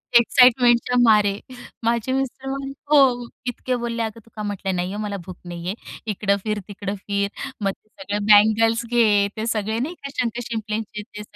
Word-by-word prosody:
एक्साईटमेंटच्या 245 0 +5
मारे. 210 -3 +4 0.4
माझे 235 +2 0
मिस्टर 270 0 -3
म्हण 275 0 -4 0.2
हो. 255 -5 +5 0.2
इतके 250 +1 -2
बोलले. 235 -1 -2
अगं 220 0 -5
तू - - -20
का 215 - -5
म्हटलं 195 -2 -2
नाही 180 +1 -2
आहे 210 - -4
मला 205 -1 -3
भूक 185 -1 -9
नाही 175 0 -7
आहे. 190 - -2 0.4
इकडं 200 0 +1
फिर, 215 -1 -1
तिकडं 200 -1 -5
फिर. 200 0 -2 0.3
मग 195 - +2
ते 205 - -20
सगळे 205 0 -4
बंगल्स 225 +2 +5
घे, 215 -4 +3
ते 220 - -2
सगळे 220 0 -1
नाही 305 +9 -3
का 275 - -5
शंक 235 -1 -1
शिंपलेचे 215 -2 -4
ते 210 0 -10
220 Hz, 180 wpm, -22 LUFS, 205-240 Hz, 0.4 s, एक्साईटमेंटच्या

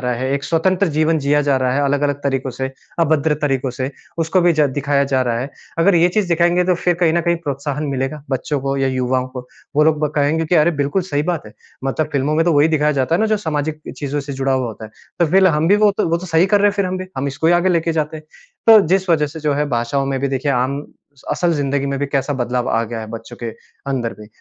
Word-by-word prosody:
रहा 125 -1 -1
है 130 +2 -3
एक 140 0 -2
स्वतंत्र 180 +5 +1
जीवन 155 +1 +2
जिया 145 +1 +2
जा 140 -2 +2
रहा 130 -1 0
है 145 - +1
अलग-अलग 145 0 +1
तरीकों 135 -1 -1
से 130 +2 -4 0.3
अभद्र 155 -1 +2
तरीकों 135 -2 0
से 130 +2 -4 0.3
उसको 165 +3 +2
भी 175 -1 +4
ज 150 -1 +3
दिखाया 140 0 +1
जा 130 -1 +3
रहा 120 -2 -1
है। 135 - -5 0.3
अगर 190 +3 +4
ये 170 +1 +5
चीज़ 195 0 0
दिखाएँगे 175 +1 +2
तो 180 0 +2
फ़िर 175 +1 0
कहीं 165 -3 +3
न 170 - +2
कहीं 170 +1 +1
प्रोत्साहन 145 -1 -4
मिलेगा, 135 +2 -3
बच्चों 135 +2 -1
को 135 0 -2
या 135 0 +1
युवाओं 130 0 0
को। 125 -1 -8 0.3
वो 150 - +5
लोग 155 -1 +3
ब - - +1
कहेंगे 150 +3 +1
कि 180 - +1
अरे! 160 +2 +5
बिल्कुल 145 +5 -1
सही 145 -5 -1
बात 170 -8 -2
है। 105 - -12 0.3
मतलब 145 +3 -1
फ़िल्मों 140 +2 0
में 165 - +2
तो 170 - +3
वहीं 145 +2 +4
दिखाया 150 -1 +2
जाता 135 +4 0
है 185 - +1
ना 220 - +3
जो 215 0 +2
सामाजिक 155 -4 -3 0.2
चीज़ों 145 0 -3
से 140 0 -7
जुड़ा 135 0 -1
हुआ 130 -2 0
होता 110 -1 -8
है। 110 - -10 0.3
तो 170 - +3
फ़िर 190 0 +5
हम 160 -1 +2
भी 205 - +5
वो 210 -1 +4
तो 170 - +1
वो 170 - +2
तो 185 - -8
सही 165 +2 +3
कर 205 +1 +3
रहे 205 - +5
हैं - - 0
फ़िर 200 -2 +1
हम 185 0 -3
भी, 185 - -6
हम 135 +2 -2
इसको 140 +4 -2
ही 170 - +5
आगे 175 +2 +3
लेके 170 -2 +1
जाते 155 0 -2
हैं। 155 - -10 0.4
तो 220 -2 +9
जिस 190 +2 +1
वज़ह 150 -2 +3
से 155 +2 -9
जो 150 -1 0
है 150 +1 0
भाषाओं 125 +3 -1
में 135 -1 -1
भी 140 - 0
देखिए 135 +1 -1
आम 135 +3 -1 0.5
असल 175 -1 +1
ज़िंदगी 140 -1 -1
में 140 -1 -2
भी 145 - -1
कैसा 140 +1 -1
बदलाव 125 0 -1
आ 115 - +1
गया 115 0 -6
है 110 - -6
बच्चों 115 0 -8
के - - -2 0.4
अंदर 120 -4 -2
भी। 105 - -12
145 Hz, 275 wpm, -19 LUFS, 135-165 Hz, 0.5 s, तो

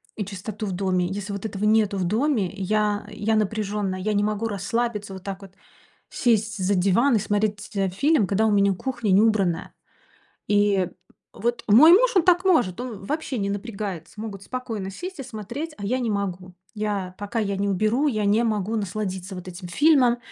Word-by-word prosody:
и 210 - -3
чистоту 200 +2 -6
в 195 - -3
доме. 185 -1 0
Если 200 +2 -5
вот 200 +2 -5
этого 200 -1 -4
нету 210 -2 +3
в 185 - 0
доме, 220 - +1
я 205 +1 0
я 220 +1 0
напряженная, 205 -2 -1
я 210 +3 -1
не 205 0 +2
могу 215 +1 -1
расслабиться 210 0 -2
вот 190 0 -9
так 195 0 -6
вот, 195 - -12 0.6
сесть 225 -2 +1
за 190 +1 +1
диван 205 +7 +3
и - - +1
смотреть 205 0 0
ть - - -15
э, 195 -1 +1
фильм, 280 - +2
когда 215 +3 +2
у - - +2
меня 200 -1 +3
кухня 235 0 -2
не 190 +2 +6
убранная. 195 -6 +1 0.8
И, 205 -3 +3 0.4
вот, 235 +2 -2
мой 280 +11 +8
муж, 485 +2 +5
он 345 - +5
так 360 0 +4
может, 245 - +2
он 225 -6 -6
вообще 290 0 -3
не 200 0 -1
напрягается. 200 -2 -5
Могут 200 -3 -6
спокойно 225 -6 -5
сесть 355 - -7
и - - -3
смотреть, 250 +6 -6
а 205 - -6
я 255 +5 0
не 235 -3 -1
могу. 185 -3 -3 0.2
Я 205 -4 -3
пока, 205 +3 -4
я 200 -2 -1
не 200 +1 -1
уберу, 215 +9 +1
я 215 -6 -1
не 205 +3 +3
могу 215 -1 -1
насладиться 195 -2 -4
вот 180 - -8
этим 180 0 -8
фильмом. 255 - +4
210 Hz, 195 wpm, -24 LUFS, 195-230 Hz, 0.8 s, мой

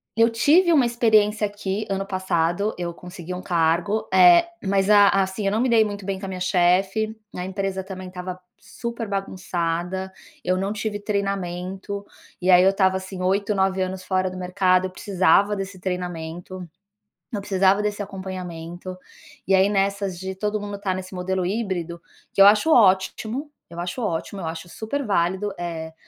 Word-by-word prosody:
eu 230 +1 +5
tive 325 +9 +4
uma 270 -5 +5
experiência 215 -3 +3
aqui 205 0 -4
ano 195 0 -1
passado, 185 +1 0
eu 170 -1 -4
consegui 180 0 -8
um 180 - -5
cargo, 175 +6 +1
eh, 180 - +7 0.2
mas 195 0 +1
a 205 -1 +7
assim, 195 +1 0
eu 195 - +2
não 220 +3 +1
me 255 - +1
dei 225 -2 +5
muito 205 -2 -6
bem 195 -1 -3
com 195 - -6
a - - -5
minha 185 -1 -6
chefe, 190 +5 +2 0.2
a 180 - -4
empresa 190 0 -3
também 185 -1 -7
estava 180 0 -6 0.2
super 230 +2 -6
bagunçada, 185 -1 -3 0.3
eu 185 +1 +1
não 195 +2 -1
tive 215 -1 -3
treinamento, 195 -1 -3 0.4
e 185 +1 +3
aí 180 0 +7
eu 195 - +5
estava 190 -1 +2
assim 190 0 -7
8, 200 +3 +1
9 190 0 +1
anos 185 0 -3
fora 185 0 0
do 185 - -8
mercado, 185 0 +2
eu - - -3
precisava 195 +2 +2
desse 195 -1 -6
treinamento, 180 0 -5 0.6
eu 210 - -2
precisava 195 0 +2
desse 210 0 -2
acompanhamento, 185 -2 -7 0.5
e 195 - +2
aí 190 +1 +5
nessas 195 -2 0
de 190 0 -4
todo 210 +2 -2
mundo 205 -1 -6
tá 190 -2 -1
nesse 185 0 -7
modelo 185 0 -2
híbrido, 180 -5 -3 0.3
que 195 - +3
eu 200 - +10
acho 215 +10 +5
ótimo, 220 +7 +2 0.2
eu 170 0 -9
acho 175 +8 -4
ótimo, 195 0 -3
eu 165 - -4
acho 165 +2 -6
super 225 +10 -4
válido, 190 0 0
eh, 160 -2 -5
190 Hz, 175 wpm, -23 LUFS, 180-205 Hz, 0.6 s, eu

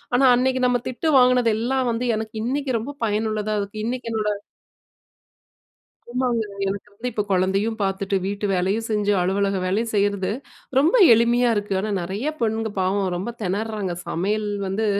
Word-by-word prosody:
ஆனா, 255 - +3
அன்னைக்கு 260 0 +1
நம்ம 245 -1 +1
திட்டு 255 +6 -2
வாங்கினது 250 -2 +4
எல்லாம் 255 +2 0
வந்து 235 +2 -2
எனக்கு 220 0 -6
இன்னைக்கு 270 +1 -1
ரொம்ப 275 +6 -6
பயனுள்ளதா, 215 0 -1
அதுக்கு 205 +2 -5
இன்னைக்கு 245 0 -3
என்னோட 215 -1 0 1.8
ஆமாங்க. 245 -2 0 0.2
எனக்கு 195 +1 -4
வந்து 230 +5 -4
இப்போ 210 - 0
குழந்தையும் 195 +4 +1
பார்த்துட்டு, 195 0 -1
வீட்டு 205 +1 -2
வேலையும் 195 +5 0
செஞ்சு, 210 -1 +1
அலுவலக 195 +2 +1
வேலையும் 215 +5 0
செய்யிறது, 200 -2 +1 0.5
ரொம்ப 310 - +3 0.2
எளிமையா 235 +2 +3
இருக்கு. 205 -1 -1
ஆனா, 215 +2 -3
நிறைய 200 - -3
பெண்ணுங்க 220 -1 0
பாவம் 190 +1 +1
ரொம்ப 195 +7 -4
திணறாங்க. 205 -1 -2
சமையல் 210 +5 -1 0.2
வந்து 205 +3 -1
215 Hz, 150 wpm, -23 LUFS, 200-240 Hz, 1.8 s, வாங்கினது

